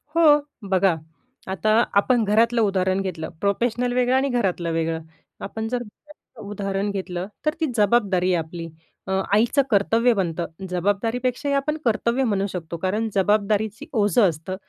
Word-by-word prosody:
हो. 300 -3 +6 0.3
बघा, 190 -2 +3 0.6
आता 205 +3 -1 0.3
आपण 245 -1 +2
घरातलं 230 +3 +3
उदाहरण 190 -2 +1
घेतलं. 165 -4 -4
प्रोफेशनल 240 +4 0
वेगळं 250 +1 +2
आणि 270 +1 +2
घरातलं 185 -8 0
वेगळं. 165 0 -1 0.4
आपण 220 +2 -5
जर 250 - 0
ह्याचं 225 -2 -15
उदाहरण 200 0 -2
घेतलं, 185 -1 -4 0.2
तर 305 - +2
ती 320 - +1
जबाबदारी 200 -4 +2
आहे 165 -2 +1
आपली. 165 0 -7 0.4
अ, - - -3 0.2
आईचं 235 +6 +4
कर्तव्य 225 +4 +3
बनतं. 175 -4 -2 0.2
जबाबदारीपेक्षाही 235 - -1
आपण 300 +3 0
कर्तव्य 235 +3 +1
म्हणू 200 -4 0
शकतो. 170 -1 -5
कारण 210 +6 -1
जबाबदारीची 210 +2 +1
ओझं 205 -2 +3
असतं. 165 +4 -5
205 Hz, 145 wpm, -23 LUFS, 185-240 Hz, 0.6 s, हो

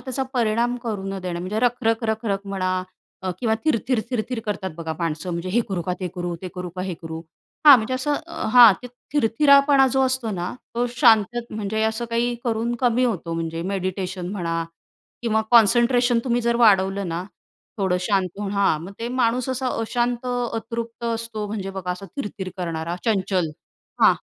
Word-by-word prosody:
त्याचा 265 0 -3
परिणाम 235 0 +1
करू 215 -5 -3
न 195 0 -4
देणं. 175 -2 -3
म्हणजे 190 +4 -3
रख-रख-रख-रख 225 -4 0
म्हणा 185 -1 -1 0.6
किंवा 220 -2 +2
थीर-थीर-थीर-थीर 245 -3 -1
करतात 195 -2 -2
बघा 165 -1 -4
माणसं. 170 +2 -2
म्हणजे 170 +2 -3
हे 220 +6 +2
करू 185 -3 -2
का 180 - -2
ते 185 - -2
करू? 175 -1 -3
ते 185 - -4
करू 180 0 -5
का 180 - -2
हे 185 -1 -3
करू? 160 0 -6 0.5
हां, 285 -2 +12
म्हणजे 240 +2 -2
असं 265 +3 0
अ 335 - -5
हां, 240 -4 +10
ते 250 - -6 0.3
थीर-थीरापणा 280 +1 +5
जो 265 - +2
असतो 255 -3 -1
ना, 180 -3 -3 0.2
तो 240 +1 +1
शांतत 230 +1 +4
म्हणजे 215 0 -2
असं 220 +2 0
काही 240 +1 +1
करून 235 0 0
कमी 250 0 +3
होतो 185 -8 -2
म्हणजे 165 0 -3
मेडिटेशन 185 -1 -3
म्हणा 165 -4 -2 0.6
किंवा 220 -2 +2
कॉन्सन्ट्रेशन 240 +2 +5
तुम्ही 245 -2 +1
जर 235 0 +1
वाढवलं 195 -4 +3
ना, 165 +1 -3 0.6
थोडं 190 -2 +1
शांत 190 0 +1
होऊन 205 -1 -3
हां, 200 -6 +2
मग 180 +4 -8
ते 230 - -3
माणूस 250 0 0
असा 260 0 -1
अशांत 240 +2 -1
अतृप्त 235 -1 -3
असतो 230 -2 -3
म्हणजे 200 -2 -4
बघा, 190 -2 -4
असा 190 +2 -9
थीर-थीर 205 -7 -5
करणारा 170 -1 -3
चंचल 190 -6 +1 0.5
हां. - - +7
220 Hz, 170 wpm, -23 LUFS, 185-240 Hz, 0.6 s, हां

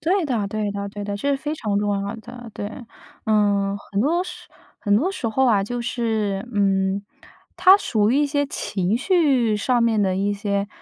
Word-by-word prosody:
对 355 +4 +1
的 230 -7 -1
对 210 0 -2
的 200 0 -4
对 205 0 -7
的， 200 0 -3
这 280 +7 -1
是 275 - +2
非 295 +2 -4
常 210 -9 -1
重 205 0 0
要 200 +1 -4
的， 240 +1 -10
对。 205 - -5 0.5
呃， 200 -2 +2 0.2
很 200 - +1
多 330 +9 +2
时 365 -1 -10 0.3
很 205 -1 +2
多 315 - +1
时 370 -12 -3
候 265 +4 +2
啊， 205 -5 +3
就 245 +2 -4
是， 220 -4 -1
嗯， 195 -1 +1 0.5
它 380 +1 +7
属 215 - +1
于 265 - +3
一 295 - +3
些 285 0 0
情 200 -6 -1
绪 265 - +2
上 240 +3 +1
面 225 -2 +2
的 190 -2 +1
一 200 +1 0
些 200 -1 -2
215 Hz, 210 characters per minute, -22 LUFS, 200-265 Hz, 0.5 s, 它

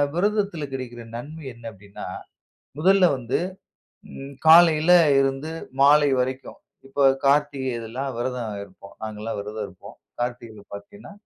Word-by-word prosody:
விரதத்தில 200 -3 0
கிடைக்கின்ற 120 -3 -6
நன்மை 150 +5 -9
என்ன 115 -1 -9
அப்டின்னா, 100 0 -11 0.7
முதல்ல 190 +3 +5
வந்து 125 -1 -2 1.1
காலையில 165 0 +7 0.2
ம் 145 - +4
இருந்து 135 +3 -1 0.3
மாலை 145 +1 +6
வரைக்கும் 130 +1 -4 0.3
இப்போ 140 +1 -1 0.2
கார்த்திகை 140 -1 +2
இதெல்லாம் 120 +5 -5
விரதம் 120 -2 -3
இருப்போம். 100 0 -15
நாங்க 110 -1 -6
எல்லாம் 115 0 -4
விரதம் 105 +1 -5
இருப்போம். 90 - -14 0.2
கார்த்திகை 120 -4 -5
பாத்தீங்கன்னா, 100 - -11
130 Hz, 125 wpm, -23 LUFS, 115-150 Hz, 1.1 s, காலையில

